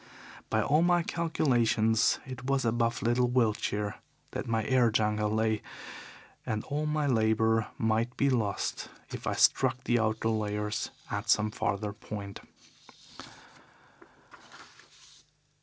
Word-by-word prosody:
By 110 -1 +1
all 150 +6 +3
my 175 0 +3
calculations 120 -10 +2
it 125 -1 -8
was 135 -1 0
above 115 +1 0
little 120 +1 +2
Wiltshire 105 -4 0 0.3
that - - -5
my 115 -1 0
air 125 0 +3
jungle 105 -1 +1
lay, 110 0 0 0.8
and 110 -1 -3
all 150 +2 -2
my 150 0 0
labour 110 -3 +2
might 110 +2 0
be 140 - +2
lost 115 -7 -1 0.2
if - - -6
I - - +1
struck 130 -1 +3
the 120 -1 +2
outer 110 0 0
layers 105 -1 -2 0.2
at - - -3
some 105 0 +3
farther 100 0 -2
point. 100 -1 -7
115 Hz, 120 wpm, -29 LUFS, 110-130 Hz, 0.8 s, all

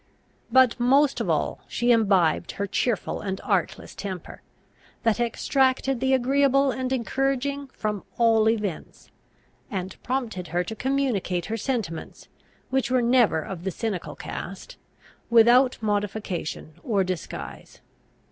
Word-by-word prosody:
But 260 -2 +5
most 275 +4 +3
of - - -2
all - - 0
she 240 0 +1
imbibed 195 -8 +3
her 200 - -2
cheerful 220 +3 -1
and 190 -1 -3
artless 190 -5 -1
temper, 190 -4 -7 0.6
that 225 -1 +2
extracted 260 +2 +1
the 265 +1 +3
agreeable 275 +1 +3
and 255 +1 -3
encouraging 270 +2 -1
from 210 -5 -4
all 225 -2 +4
events, 210 -7 -4 0.6
and 190 -4 -5
prompted 235 -9 -3
her 175 +3 0
to 220 +5 -6
communicate 235 -9 -1
her 220 - -3
sentiments, 215 -9 -4 0.4
which 265 -2 +1
were 255 -1 +2
never 235 -10 +3
of 180 -3 -7
the 190 - -1
cynical 200 -2 -4
cast, - - -7 0.5
without 240 +3 +6
modification 205 -6 -3
or 205 -7 +1
disguise. 185 -2 -6
230 Hz, 125 wpm, -25 LUFS, 195-260 Hz, 0.6 s, without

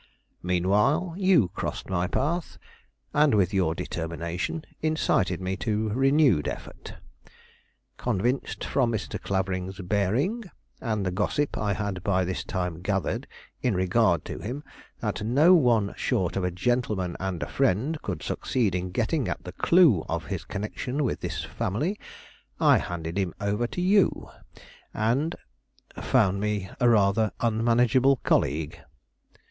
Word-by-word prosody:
Meanwhile, 105 - +2
you 185 - +4
crossed - - -5
my 90 -1 0
path, 165 - -2 0.6
and 150 -4 +4
with 95 -2 +2
your 90 -4 +1
determination 85 - -4 0.2
incited 155 - +1
me 95 0 -2
to 110 0 -1
renewed 135 - +3
effort. - - -7 1.0
Convinced 120 +3 -1
from 125 -4 +1
Mr. 110 -2 -4
Clavering's 95 0 -2
bearing, 110 - 0 0.4
and 110 -5 -1
the 95 - 0
gossip 110 +10 0
I 105 -1 0
had 100 -3 -3
by 95 -2 +1
this 90 +1 -3
time 90 -3 -3
gathered 95 +1 -1 0.3
in 125 -6 +1
regard 95 -2 +2
to - - -6
him, 130 +7 -5 0.4
that 105 -2 -2
no 145 +11 +5
one 120 - +3
short 90 -3 -1
of 95 - -1
a 90 - +1
gentleman 95 -2 -1
and 95 -3 -3
a - - -4
friend 135 - 0
could 90 -6 -4
succeed 115 -8 0
in 90 0 -2
getting 120 - 0
at - - -4
the 90 - -7
clue 160 - +4
of - - -2
his - - -5
connection 125 +7 -3
with 130 - -1
this - - -4
family, 150 - -2 0.6
I - - +5
handed 85 +1 -4
him 95 -3 -2
over 105 +3 0
to 180 - -4
you, 195 +2 +2 0.7
and 125 +9 +1 0.3
" - - -37
"Found 95 +1 +2
me 105 -2 -2
rather 110 -2 +3
an 115 -2 0
unmanageable 120 +3 +4
colleague." 75 +3 0
105 Hz, 140 wpm, -26 LUFS, 95-130 Hz, 1.0 s, no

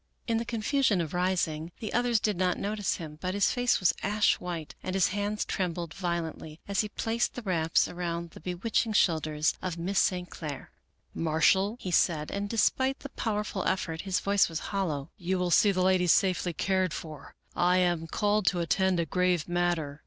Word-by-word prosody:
In 230 -2 0
the 230 - -2
confusion 230 -1 +1
of 160 -3 -3
rising 175 -3 -1
the 215 - -5
others 240 -1 +2
did 210 -1 0
not 180 0 +1
notice 205 0 -1
him, 155 -2 -8
but 185 +1 -2
his 200 - +3
face 245 -1 +2
was 185 - +3
ash 210 +1 +2
white 170 -4 -5
and 185 - -4
his 190 - +3
hands 205 +1 -2
trembled 175 -3 -3
violently 170 -3 -4
as 200 -1 +1
he 210 - -4
placed 230 +2 -1
the 245 - -6
wraps 165 -5 +2
around 170 -1 -4
the - - -12
bewitching 190 +6 -1
shoulders 155 -5 +2
of 180 -2 -3
Miss 190 +3 0
St. 180 -1 +1
Clair. 150 -6 -7 0.3
" - - -43
Marshall," 180 +7 +2
he 185 - -5
said, 155 -3 +2
and 200 0 -3
despite 260 +4 +1
the 280 - -7
powerful 210 -5 -2
effort 165 -3 -1
his 190 -2 0
voice 200 -2 +3
was 165 - -4 0.2
hollow, 160 -7 -2
" - - -49
you 185 +1 -1
will 180 -1 -1
see 205 +4 +5
the 185 -1 0
ladies 185 -2 +4
safely 185 -2 +1
cared 185 0 0
for, 155 -3 -9 0.2
I 180 +1 +3
am 175 -3 +1
called 205 +3 0
to 180 - +3
attend 185 +2 +1
a 170 - +1
grave 180 -1 +1
matter." 175 -4 -1
180 Hz, 195 wpm, -29 LUFS, 170-205 Hz, 0.3 s, see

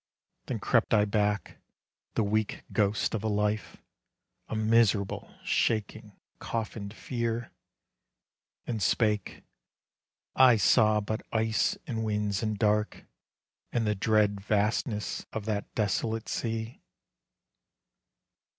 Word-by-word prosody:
Then - - -2
crept - - +2
I 105 -1 +4
back, 105 -1 -1 0.6
the 115 - +2
weak 105 +1 -1
ghost 105 0 +1
of 110 -2 -2
a - - 0
life, 105 0 -1 0.7
A - - -4
miserable, 110 -2 +2
shaking, 110 -1 -1 0.2
coffined 110 -3 -4
fear, 115 -1 -3 1.1
And 115 -3 -3
spake, 105 +1 0 0.9
"I 130 -3 +7
saw 110 0 +4
but 110 +2 -3
ice 110 - +1
and 115 -7 -3
winds 105 -2 -1
and 110 -2 -1
dark, 105 0 0 0.7
And 120 -2 0
the 105 - +2
dread 105 0 +2
vastness 105 +2 -1
of 110 -2 -4
that 105 -2 -2
desolate 110 +1 -1
sea." 115 0 -3
110 Hz, 105 wpm, -29 LUFS, 105-115 Hz, 1.1 s, I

